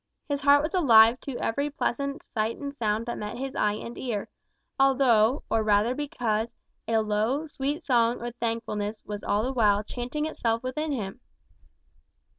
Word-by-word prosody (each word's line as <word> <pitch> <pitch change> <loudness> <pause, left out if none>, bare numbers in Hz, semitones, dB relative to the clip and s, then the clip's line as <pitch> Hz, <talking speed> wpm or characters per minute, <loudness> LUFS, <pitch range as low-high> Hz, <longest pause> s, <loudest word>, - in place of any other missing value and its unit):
His 285 -1 -2
heart 285 +1 +5
was 310 - -3
alive 235 -8 +6
to 270 -3 -6
every 280 +6 -1
pleasant 280 0 -2
sight 220 0 -2
and 280 -1 -5
sound 220 -4 -1
that 240 - -4
met 210 +1 -5
his 270 +1 -5
eye 210 -1 +2
and 230 +3 -7
ear; 225 -6 -3 0.5
although, 260 -2 +4
or 225 - +1
rather 215 +2 +3
because, 235 -5 -2 0.3
a 225 - +2
low, 220 +8 0
sweet 295 +1 -3
song 235 -2 +2
of 240 - -4
thankfulness 225 -2 -3
was 210 -1 -5
all 205 +1 +1
the 260 +2 -2
while 210 -4 +3
chanting 250 +7 -4
itself 230 -7 -1
within 300 +5 -2
him. 220 -4 -4
235 Hz, 165 wpm, -27 LUFS, 215-280 Hz, 0.5 s, alive